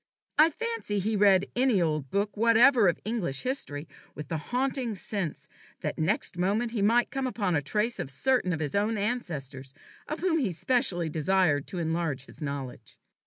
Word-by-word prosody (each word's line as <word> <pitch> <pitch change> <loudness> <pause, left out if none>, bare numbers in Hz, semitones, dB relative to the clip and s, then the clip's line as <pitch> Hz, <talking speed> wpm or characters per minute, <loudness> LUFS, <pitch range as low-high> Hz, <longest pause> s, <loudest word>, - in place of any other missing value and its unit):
I 315 +2 +8
fancy 455 - -3
he 210 +3 0
read 195 -2 +5
any 245 -4 +3
old 155 -5 0
book 200 +4 -1
whatever 230 +1 +5
of 170 - +1
English 210 - -2
history 165 - -3 0.3
with 150 -1 -8
the 160 - -2
haunting 255 -2 -1
sense 190 -5 -4 0.3
that - - -3
next 175 +1 0
moment 210 +6 +1
he 225 -3 -2
might 235 +4 +3
come 270 -1 -1
upon 205 -7 -1
the 145 - +2
trace 210 - -1
of - - -3
certain 240 - +1
of 160 -2 -2
his 145 -2 -2
own 210 +2 +1
ancestors 150 - -4 0.3
of 310 - -4
whom 345 -3 +2
he 220 -11 0
specially 190 - 0
desired 160 -2 +1
to 185 - -6
enlarge 160 -5 -2
his - - -16
knowledge. 135 -6 -6
200 Hz, 175 wpm, -28 LUFS, 160-240 Hz, 0.3 s, I